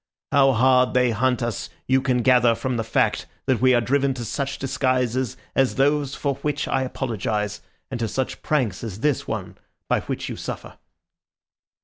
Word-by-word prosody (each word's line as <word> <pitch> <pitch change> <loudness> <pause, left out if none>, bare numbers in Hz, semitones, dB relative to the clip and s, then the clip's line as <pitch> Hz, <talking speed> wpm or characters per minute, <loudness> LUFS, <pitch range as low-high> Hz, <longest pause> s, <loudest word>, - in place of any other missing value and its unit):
How 135 -2 +5
hard 125 +1 +4
they 125 -1 +4
hunt 125 +3 +1
us 120 -3 -3 0.2
you 130 +1 +3
can 125 -2 +1
gather 125 -2 +5
from 130 +2 -2
the 115 - -1
fact 110 -1 0 0.2
that 130 -4 +1
we 130 -1 +5
are 120 - +3
driven 135 +2 +1
to 120 -2 -5
such 140 +3 -3
disguises 130 -2 0 0.2
as 135 -1 +2
those 140 0 +1
for 140 -2 -2
which 145 0 -2
I 135 - +1
apologise, 105 -5 -2 0.3
and 125 - -3
to 115 - 0
such 130 +4 -3
pranks 120 -11 0
as 110 -2 -6
this 150 -2 0
one - - -5 0.3
by - - +2
which - - -4
you - - -5
suffer." - - -7
130 Hz, 175 wpm, -23 LUFS, 115-135 Hz, 0.3 s, How